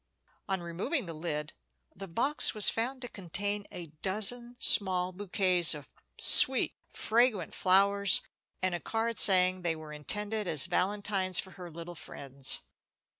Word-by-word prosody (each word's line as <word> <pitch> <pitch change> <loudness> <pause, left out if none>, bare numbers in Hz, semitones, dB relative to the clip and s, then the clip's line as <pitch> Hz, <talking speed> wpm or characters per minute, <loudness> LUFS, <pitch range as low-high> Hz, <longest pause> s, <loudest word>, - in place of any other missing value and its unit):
On 190 -2 -2
removing 185 - -4
the 165 - -8
lid, 155 -1 -6 0.4
the 195 +2 -9
box 245 - +1
was 210 - +5
found 255 +3 -3
to - - -6
contain 205 +1 -5
a 175 - -9 0.2
dozen 235 +5 +1
small 185 -5 +3
bouquets 185 -3 +1
of 145 -1 -13 0.2
sweet, - - +3 0.2
fragrant 230 -2 -1
flowers, 200 +1 +3 0.4
and 185 -1 0
a 175 - -4
card 225 +4 -3
saying 185 -1 +5
they 170 -2 -2
were 155 -1 -11
intended 210 +7 -3
as 155 -4 +3
valentines 190 0 -1
for 190 - -1
her 180 -2 -11
little 170 +2 -10
friends. 135 -4 -1
190 Hz, 140 wpm, -29 LUFS, 170-210 Hz, 0.4 s, was